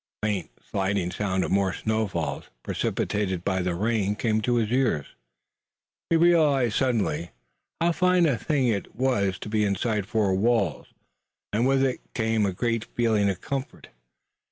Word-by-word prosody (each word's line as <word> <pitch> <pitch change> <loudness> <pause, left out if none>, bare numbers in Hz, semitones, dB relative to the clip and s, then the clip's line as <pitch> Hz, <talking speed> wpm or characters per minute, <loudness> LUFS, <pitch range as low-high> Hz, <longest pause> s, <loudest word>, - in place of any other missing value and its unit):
The - - +2
faint, 100 -4 -2 0.2
sliding 95 -2 -1
sound 95 -2 -1
of - - -3
more 95 -1 +2
snow 110 0 -1
falls 75 -7 -3 0.2
precipitated 95 -4 -1
by 95 -1 +1
the 90 -1 -1
rain 105 +1 0
came 110 -1 0
to 120 +3 +1
his 115 -2 0
ears. 120 - +1 1.0
He 165 - +3
realized 150 -9 +4
suddenly 115 -9 0 0.5
how 170 +1 +3
fine 180 0 +3
a 145 -5 +3
thing 135 +1 0
it 105 -4 -2
was 110 -8 +1
to - - -8
be 105 0 +1
inside 105 0 0
four 110 -4 +1
walls, 100 - +1 0.7
and 115 +4 +2
with 135 0 +3
it 130 -2 -1 0.2
came 110 -2 +1
a - - 0
great 115 +3 -1
feeling 110 -4 +2
of 95 -2 -3
comfort. 135 -1 -5
110 Hz, 160 wpm, -26 LUFS, 95-125 Hz, 1.0 s, realized